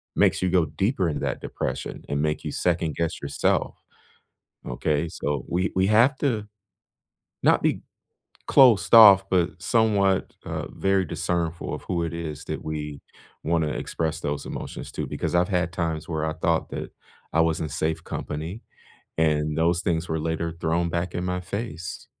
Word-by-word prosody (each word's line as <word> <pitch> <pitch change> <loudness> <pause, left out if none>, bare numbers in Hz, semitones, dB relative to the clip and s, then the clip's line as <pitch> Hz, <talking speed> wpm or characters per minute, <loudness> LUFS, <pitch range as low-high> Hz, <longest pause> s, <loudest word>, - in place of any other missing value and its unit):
makes - - +3
you 95 - +2
go 90 -2 +3
deeper 90 - 0
into 75 - -2
that - - -2
depression - - -4
and 70 0 -1
make 75 0 -1
you - - -3
second 85 -3 0
guess 85 -1 -2
yourself. 70 0 -1 0.8
Okay? 75 +5 -1
So 70 -4 -3
we 90 +2 0
we 95 +1 +3
have 120 +5 +4
to, 115 -8 -1 1.0
not - - +4
be - - +1 0.6
closed 120 -7 +5
off, 100 -4 +9
but 90 -1 +1
somewhat, 100 -4 +2
uh, - - -4
very 95 -1 +1
discernful 85 +1 -2
of - - -7
who 85 -2 -1
it 85 - -4
is 80 -4 -5
that - - -5
we 75 -2 -5 0.4
wanna 80 -1 +1
express 80 +1 -3
those 70 -1 -3
emotions - - -6
to - - -3
because - - -3
I've 90 +1 +3
had 90 -3 0
times 80 -3 -2
where 80 -1 -1
I 80 - -2
thought 80 +1 0
that - - -6 0.4
I 80 - +3
was 80 -1 +2
in 80 - -2
safe 80 +2 -2
company, 80 +9 -5 0.6
and 75 -1 +1
those 85 +2 +2
things 85 -2 -1
were 80 - -1
later 80 +1 -2
thrown 85 +1 0
back 85 +1 -2
in 90 - -2
my 90 0 -1
face. 100 -2 -5
85 Hz, 170 wpm, -25 LUFS, 80-95 Hz, 1.0 s, off